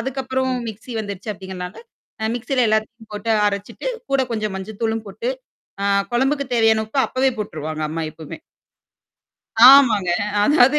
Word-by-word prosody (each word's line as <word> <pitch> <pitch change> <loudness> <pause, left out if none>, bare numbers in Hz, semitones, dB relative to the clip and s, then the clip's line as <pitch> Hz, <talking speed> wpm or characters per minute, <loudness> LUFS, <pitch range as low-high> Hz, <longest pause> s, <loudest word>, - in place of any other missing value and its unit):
அதுக்கப்புறம் 260 +1 -2 0.2
மிக்ஸி 220 +3 -8
வந்துருச்சு 200 0 -6
அப்டிங்கிறனால, 185 -2 -7 0.5
அ - - 0
மிக்ஸில 250 +1 0
எல்லாத்தையும் 220 +1 -2
போட்டு 225 +2 -1
அரைச்சுட்டு, 205 - -3 0.2
கூட 275 -1 +3
கொஞ்சம் 215 -3 -2
மஞ்சள் 200 +2 -8
தூளும் 225 0 -1
போட்டு, 465 - -4 0.5
ஆ - - 0 0.3
குழம்புக்கு 270 +3 +1
தேவையான 225 -1 +3
உப்ப 270 - -3
அப்பவே 265 +1 +1
போட்டுருவாங்க 155 -6 -4
அம்மா 165 +1 -3
எப்போமே. 160 -1 -9 1.3
ஆமாங்க. 225 -10 +6 0.3
அதாவது 290 +2 +5
220 Hz, 135 wpm, -21 LUFS, 200-260 Hz, 1.3 s, ஆமாங்க